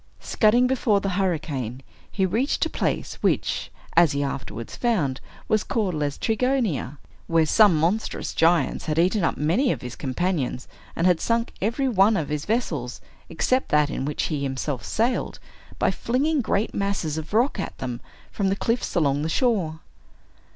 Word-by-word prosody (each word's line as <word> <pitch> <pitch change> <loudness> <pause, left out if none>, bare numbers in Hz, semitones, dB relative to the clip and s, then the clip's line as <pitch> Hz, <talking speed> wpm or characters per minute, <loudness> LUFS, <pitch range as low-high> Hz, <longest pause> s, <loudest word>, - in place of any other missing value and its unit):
Scudding 235 +3 +3
before 245 -5 +2
the 195 - -2
hurricane, 150 - -2 0.3
he 190 - +1
reached 230 +10 0
a - - -4
place, - - -2
which, - - 0 0.2
as 165 -3 +5
he 140 0 0
afterwards 115 -4 -5
found, 170 - 0 0.3
was 215 -1 +2
called 205 -6 -1
Laestrygonia, 170 - -1 0.3
where 165 -1 +3
some 205 +2 +5
monstrous 175 +8 -1
giants 165 +1 +2
had 155 0 -1
eaten 185 +4 +2
up - - +1
many 180 - +2
of - - -4
his 125 -1 -6
companions, 140 -2 -2 0.3
and 165 - 0
had 180 -3 +3
sunk 230 0 0
every 235 +7 0
one 210 -2 +4
of 155 - -2
his 150 0 -3
vessels, 235 +3 -2 0.3
except 255 +1 0
that 150 -1 +3
in - - -3
which 145 +2 -2
he 150 -4 -2
himself 135 -2 -3
sailed, 235 - -1 0.4
by - - +2
flinging 280 +5 0
great 215 -2 -1
masses 190 -6 -1
of 155 - -9
rock 235 +6 +2
at - - -5
them, 125 -2 -5 0.3
from 195 -2 0
the 195 - +1
cliffs 230 +2 -1
along 145 -4 +2
the 155 - -1
shore. 175 - 0
180 Hz, 165 wpm, -24 LUFS, 150-225 Hz, 0.4 s, as